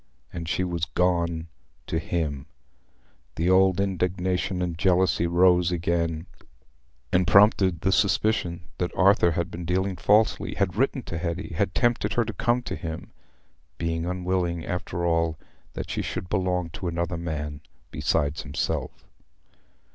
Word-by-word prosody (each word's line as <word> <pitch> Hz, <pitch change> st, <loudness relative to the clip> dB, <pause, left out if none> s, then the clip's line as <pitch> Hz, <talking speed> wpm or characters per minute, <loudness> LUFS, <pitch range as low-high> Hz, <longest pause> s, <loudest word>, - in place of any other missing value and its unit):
And 85 Hz, -2 st, -5 dB
she 90 Hz, -, 0 dB
was 85 Hz, -2 st, -1 dB
gone 85 Hz, -2 st, 0 dB, 0.4 s
to 80 Hz, -, -1 dB
him. 80 Hz, -4 st, -3 dB, 0.9 s
The 85 Hz, +3 st, +1 dB
old 95 Hz, 0 st, +4 dB
indignation 95 Hz, -1 st, -1 dB
and 90 Hz, -2 st, -2 dB
jealousy 90 Hz, -1 st, +2 dB
rose 90 Hz, 0 st, +4 dB
again, 85 Hz, -1 st, -1 dB, 0.9 s
and 90 Hz, -1 st, +3 dB
prompted 95 Hz, -2 st, +5 dB
the 95 Hz, -, +2 dB
suspicion 95 Hz, -4 st, +1 dB, 0.2 s
that 90 Hz, -, 0 dB
Arthur 95 Hz, -3 st, +5 dB
had 85 Hz, +2 st, -2 dB
been 85 Hz, -, -6 dB
dealing 95 Hz, +2 st, 0 dB
falsely—had 100 Hz, -1 st, +2 dB
written 130 Hz, +2 st, 0 dB
to 80 Hz, -, -5 dB
Hetty—had 85 Hz, +2 st, -2 dB
tempted 120 Hz, -1 st, +1 dB
her 120 Hz, -, +2 dB
to 110 Hz, -, -4 dB
come 120 Hz, +3 st, +1 dB
to -, -, -4 dB
him—being 80 Hz, +1 st, -7 dB
unwilling, 90 Hz, -2 st, -1 dB
after 85 Hz, -1 st, -3 dB
all, 85 Hz, -1 st, +1 dB, 0.4 s
that -, -, -5 dB
she -, -, -1 dB
should 90 Hz, -, -5 dB
belong 90 Hz, -3 st, 0 dB
to 90 Hz, +1 st, -5 dB
another 85 Hz, +1 st, -2 dB
man 75 Hz, -3 st, -4 dB, 0.3 s
besides 70 Hz, +1 st, 0 dB
himself. -, -, -3 dB
90 Hz, 130 wpm, -26 LUFS, 85-95 Hz, 0.9 s, prompted